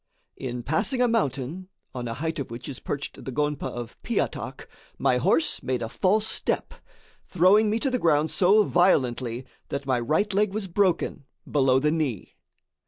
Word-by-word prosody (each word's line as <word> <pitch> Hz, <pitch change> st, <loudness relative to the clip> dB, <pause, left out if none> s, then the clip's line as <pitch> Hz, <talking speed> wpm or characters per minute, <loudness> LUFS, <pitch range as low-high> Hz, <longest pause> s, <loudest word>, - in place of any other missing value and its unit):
In 125 Hz, -2 st, -5 dB
passing 160 Hz, -, 0 dB
a 250 Hz, -, +4 dB
mountain, 170 Hz, -, -1 dB, 0.2 s
on 125 Hz, -2 st, -4 dB
a 115 Hz, -, -4 dB
height 160 Hz, +3 st, -3 dB
of 140 Hz, -, -4 dB
which 115 Hz, +1 st, -8 dB
is 135 Hz, -, -6 dB
perched 145 Hz, 0 st, -5 dB
the 135 Hz, -, -5 dB
gonpa 150 Hz, +2 st, -1 dB
of 120 Hz, -2 st, -8 dB
Piatak, -, -, -3 dB, 0.3 s
my 125 Hz, -, +2 dB
horse 160 Hz, +6 st, +2 dB
made 125 Hz, -2 st, -2 dB
a 115 Hz, -, -4 dB
false 205 Hz, -, +2 dB
step, -, -, -1 dB, 0.5 s
throwing 195 Hz, +5 st, +4 dB
me 215 Hz, -, +1 dB
to 265 Hz, +3 st, 0 dB
the 250 Hz, -, 0 dB
ground 155 Hz, -3 st, +2 dB
so 200 Hz, +4 st, +5 dB
violently 130 Hz, -, +1 dB, 0.2 s
that 140 Hz, 0 st, -4 dB
my 130 Hz, -2 st, +1 dB
right 160 Hz, -, 0 dB
leg 205 Hz, 0 st, +1 dB
was 215 Hz, -3 st, -2 dB
broken 180 Hz, -5 st, 0 dB, 0.2 s
below 135 Hz, -3 st, +3 dB
the 150 Hz, +3 st, +2 dB
knee. 150 Hz, -, -2 dB
150 Hz, 170 wpm, -26 LUFS, 130-190 Hz, 0.5 s, so